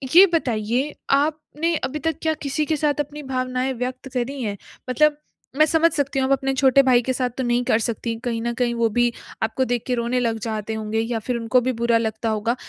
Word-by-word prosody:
ये 375 +3 +11
बताइए 245 -1 0 0.2
आपने 305 +3 0
अभी 300 +3 -2
तक 325 +2 -2
क्या 320 -1 +1
किसी 290 +2 -1
के 315 - 0
साथ 295 0 0
अपनी 295 +1 -4
भावनाएँ 255 +1 -1
व्यक्त 255 +2 -4
करी 260 +2 -2
हैं? 205 -2 -3 0.3
मतलब 295 +4 +3 0.4
मैं 310 - +6
समझ 325 +2 +3
सकती 280 -1 -1
हूँ 265 - +2
आप - - -1
अपने 270 0 +1
छोटे 265 0 +5
भाई 250 -2 +4
के 260 +2 -1
साथ 250 -1 0
तो 260 - -1
नहीं 240 0 +1
कर 220 - +3
सकती 230 0 -2
कहीं 230 -2 -1
ना 235 +1 -1
कहीं 240 0 0
वो 230 -1 +2
भी 240 0 +4 0.3
आपको 225 +4 0
देख 245 -2 -1
के 255 - 0
रोने 240 +1 0
लग 230 -2 0
जाते 220 0 -3
होंगे 220 0 -2
या 225 0 -1
फिर 245 +3 -3
उनको 235 +2 +2
भी - - +3
बुरा 235 -1 +4
लगता 220 0 -2
होगा। 220 +2 0
255 Hz, 225 wpm, -22 LUFS, 230-280 Hz, 0.4 s, ये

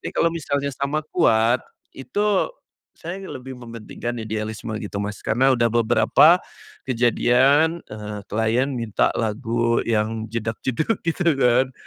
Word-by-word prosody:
Tapi - - -5
kalau 165 - +2
misalnya 140 -3 -2
sama 140 +3 -2
kuat, 115 -6 +3 0.3
itu 205 +8 0 0.5
saya 175 +3 -7
lebih 130 0 -8
mementingkan 115 0 -6
idealisme 110 +1 -4
gitu 100 -2 -4
Mas, 105 0 -5
karena 130 +5 +2
udah 120 -3 +3
beberapa, 120 +8 +4 0.5
kejadian, 130 +6 +3
eee, 105 -1 -6
klien 115 +5 +1
minta 115 -5 0
lagu 115 +1 0
yang 110 0 -1
jedag 115 -1 -3
jedug 155 - 0
gitu 170 -1 +1
kan. 130 0 +2
120 Hz, 125 wpm, -22 LUFS, 110-140 Hz, 0.5 s, beberapa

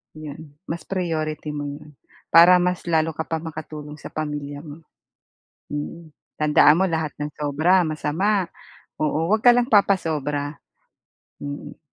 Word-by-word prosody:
'Yon, 150 -1 -10
mas 165 +1 -4
priority 155 -5 -2
mo 145 -1 -4
'yon, 145 +1 -9 0.4
para 170 +2 +8
mas 180 0 -1
lalo 160 -1 +2
ka 160 +1 -5
pa 160 -1 -2
makatulong 155 -2 -8
sa - - -8
pamilya 145 -1 -4
mo. 150 0 -10 0.9
Mm, 155 +2 -6 0.2
tandaan 150 +1 +5
mo - - +4
lahat 160 -2 -2
ng 150 0 -3
sobra 155 +5 +3
masama, 175 +6 0 0.5
oo 155 +3 0
'wag 215 0 +2
ka 240 - +9
lang 245 +1 +1
papasobra, 150 -8 +1 0.8
mm. 145 0 -7
155 Hz, 135 wpm, -23 LUFS, 150-170 Hz, 0.9 s, ka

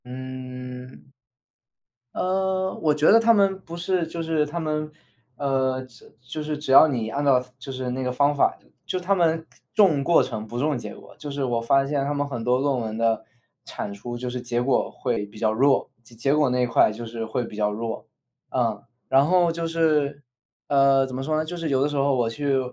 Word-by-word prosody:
嗯。 125 0 -8 1.0
呃， 190 0 0
我 155 -2 +3
觉 150 +1 +3
得 225 - +8
他 230 0 +5
们 195 -2 +3
不 170 -2 -9
是 175 0 0
就 165 +1 -5
是 160 -2 +1
他 155 +3 -4
们 155 -1 -2 0.5
呃， 130 -2 0
就 120 -3 -19
就 130 +5 -6
是 150 0 -3
只 145 -2 -4
要 155 - +9
你 120 -7 -2
按 140 +5 -2
照， 135 -3 +4 0.2
就 135 +1 -8
是 130 -1 -4
那 130 +1 -3
个 125 - -1
方 145 +3 +2
法， 140 - +2 0.3
就 185 - -2
他 190 +2 +1
们， 165 -2 +1 0.3
重 175 -10 +4
过 170 +1 +5
程 120 -4 -4
不 120 +2 -6
重 145 0 +1
结 120 - -7
果。 - - -15
就 145 - -7
是 140 0 -3
我 120 -2 0
发 135 +4 +3
现 140 -1 0
他 145 - -1
们 145 0 -1
很 120 -5 -5
多 125 +2 +2
论 135 -2 +1
文 110 -1 -4
的 115 -1 +1 0.4
产 100 - -5
出 120 +4 -7
就 125 +1 -4
是 125 0 -4
结 120 0 -1
果 125 +1 +1
会 105 - -2
比 105 +1 -14
较 110 -1 +2
弱， 135 +5 +2
结 115 - -18
结 135 +5 +1
果 150 -3 +3
那 125 0 +1
一 - - +3
块 115 -2 +4
就 115 +2 -7
是 115 0 -5
会 115 +2 -2
比 110 - -10
较 105 0 0
弱。 115 +2 -5 0.4
嗯， 115 -5 -1 0.2
然 135 +1 +4
后 175 +1 +3
就 165 0 -3
是 155 -3 +1 0.5
呃， 135 -1 +4
怎 130 - -7
么 130 - -3
说 155 +2 0
呢， 155 - 0
就 175 +3 -6
是 165 -2 -3
有 135 -2 +2
的 140 - +3
时 145 - -4
候 140 0 +2
我 120 -3 +1
去， 140 +2 0
135 Hz, 240 characters per minute, -24 LUFS, 125-155 Hz, 1.0 s, 要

